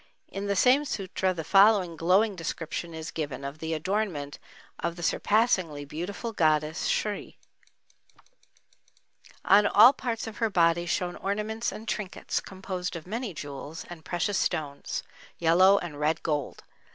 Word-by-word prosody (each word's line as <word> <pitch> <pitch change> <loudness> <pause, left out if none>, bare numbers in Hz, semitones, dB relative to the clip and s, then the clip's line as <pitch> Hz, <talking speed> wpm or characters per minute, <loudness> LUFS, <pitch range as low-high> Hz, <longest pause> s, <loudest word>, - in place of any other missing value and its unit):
In 195 +1 -5
the 200 - 0
same 255 +8 +5
sutra 190 -7 -2
the 170 -3 -4
following 195 -1 +5
glowing 190 +6 +3
description 165 0 -5
is 160 0 -6
given 145 -4 -4
of 140 +3 -6
the 160 0 -2
adornment 165 -4 -2 0.4
of 170 - -2
the 175 - -8
surpassingly 185 -8 +1
beautiful 180 - -5
goddess 155 -2 +1
Sri: 210 -1 -2 2.1
On 205 +1 +6
all 235 +6 +8
parts 235 -4 -3
of 225 -2 -8
her 225 - +1
body 170 -2 +2
shone 175 0 -1
ornaments 215 +3 -2
and 220 - -9
trinkets, 205 -5 -3
composed 185 -2 -5
of 165 - -7
many 225 +3 -4
jewels 145 0 -7
and 165 -2 -9
precious 180 +4 -1
stones, 150 -5 -2 0.3
yellow 185 +4 +5
and 165 -6 -5
red 155 +2 0
gold. 150 -4 -2
180 Hz, 140 wpm, -27 LUFS, 160-205 Hz, 2.1 s, all